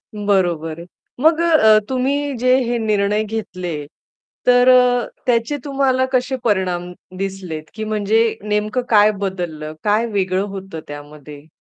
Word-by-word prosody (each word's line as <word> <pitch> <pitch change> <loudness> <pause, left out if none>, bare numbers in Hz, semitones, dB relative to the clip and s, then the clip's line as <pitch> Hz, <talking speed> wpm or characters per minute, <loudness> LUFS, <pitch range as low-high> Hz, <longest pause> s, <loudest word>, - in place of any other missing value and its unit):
बरोबर 175 -6 0
आहे. 170 - -9 0.4
मग 320 +1 +4
अ, 340 - +2 0.3
अ, - - +5
तुम्ही 275 +2 -1
जे 255 +2 +3
हे 240 0 -1
निर्णय 210 -1 +1
घेतले, 185 -6 -5 0.7
तर 245 0 +5
अ, 250 -1 +4 0.2
त्याचे 240 +4 +1
तुम्हाला 270 -2 +1
कसे 255 +1 +1
परिणाम 185 -5 -1 0.3
दिसलेत? 190 -5 -5
की 220 - -5
म्हणजे 215 +1 +1 0.2
नेमकं 210 +3 -1
काय 210 -1 +5
बदललं? 175 -6 -4
काय 215 +2 +2
वेगळं 190 -1 0
होतं 195 -4 -7
त्यामध्ये? 145 0 -11
210 Hz, 135 wpm, -19 LUFS, 185-245 Hz, 0.7 s, अ